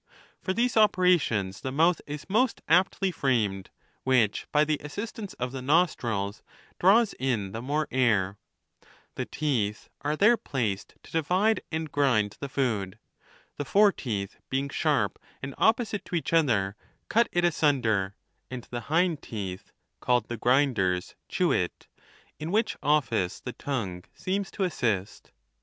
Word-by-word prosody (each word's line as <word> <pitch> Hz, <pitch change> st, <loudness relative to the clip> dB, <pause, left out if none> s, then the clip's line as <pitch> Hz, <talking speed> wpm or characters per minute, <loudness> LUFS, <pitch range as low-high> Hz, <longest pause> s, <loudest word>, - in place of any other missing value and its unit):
For 185 Hz, -, -1 dB
these 240 Hz, +5 st, +1 dB
operations 180 Hz, -, +3 dB
the 130 Hz, -, -3 dB
mouth 165 Hz, +5 st, +3 dB
is 145 Hz, 0 st, -6 dB
most 225 Hz, +6 st, +1 dB
aptly 190 Hz, +1 st, +3 dB
framed, 110 Hz, -, 0 dB, 0.3 s
which, 125 Hz, -6 st, +2 dB
by 150 Hz, 0 st, +4 dB
the 155 Hz, -1 st, -1 dB
assistance 205 Hz, +6 st, -6 dB
of 125 Hz, 0 st, -3 dB
the 135 Hz, -1 st, -5 dB
nostrils, 120 Hz, -, +1 dB, 0.4 s
draws 210 Hz, +5 st, +5 dB
in 115 Hz, -7 st, -1 dB
the 115 Hz, -, -5 dB
more 150 Hz, +4 st, -1 dB
air. 105 Hz, -7 st, +2 dB, 0.4 s
LIV. -, -, -27 dB, 0.3 s
The -, -, -3 dB
teeth 115 Hz, -9 st, -1 dB
are 150 Hz, +1 st, 0 dB
there 215 Hz, +8 st, +5 dB
placed 110 Hz, -, -3 dB
to -, -, -15 dB
divide 185 Hz, +8 st, +2 dB
and 160 Hz, -2 st, -3 dB
grind 120 Hz, -8 st, +2 dB
the 140 Hz, -, -5 dB
food.' 110 Hz, -9 st, -1 dB, 0.6 s
The 145 Hz, -, -2 dB
fore 205 Hz, +7 st, +5 dB
teeth, 100 Hz, -, -4 dB
being 135 Hz, +1 st, -1 dB
sharp -, -, 0 dB, 0.2 s
and 135 Hz, 0 st, -4 dB
opposite 220 Hz, -2 st, +2 dB
to -, -, -4 dB
each 165 Hz, -, -2 dB
other, 110 Hz, -12 st, +2 dB, 0.3 s
cut 235 Hz, +2 st, +3 dB
it 175 Hz, 0 st, +2 dB
asunder, 115 Hz, -, +1 dB, 0.3 s
and 125 Hz, -2 st, -6 dB
the 120 Hz, -, -2 dB
hind 165 Hz, -1 st, +2 dB
teeth 95 Hz, -4 st, -6 dB, 0.3 s
(called 125 Hz, -3 st, +1 dB
the 120 Hz, -, -3 dB
grind 130 Hz, +1 st, +3 dB
ers) 90 Hz, -1 st, 0 dB, 0.2 s
chew -, -, +1 dB
it, -, -, -1 dB, 0.5 s
in 155 Hz, -, -4 dB
whioh 215 Hz, +4 st, +1 dB
office 130 Hz, -11 st, +1 dB
the 125 Hz, -, -6 dB
tongue 100 Hz, -11 st, -4 dB
seems 195 Hz, +1 st, -2 dB
to 195 Hz, -, -3 dB
assist. 110 Hz, -, -2 dB
135 Hz, 150 wpm, -27 LUFS, 110-175 Hz, 0.6 s, draws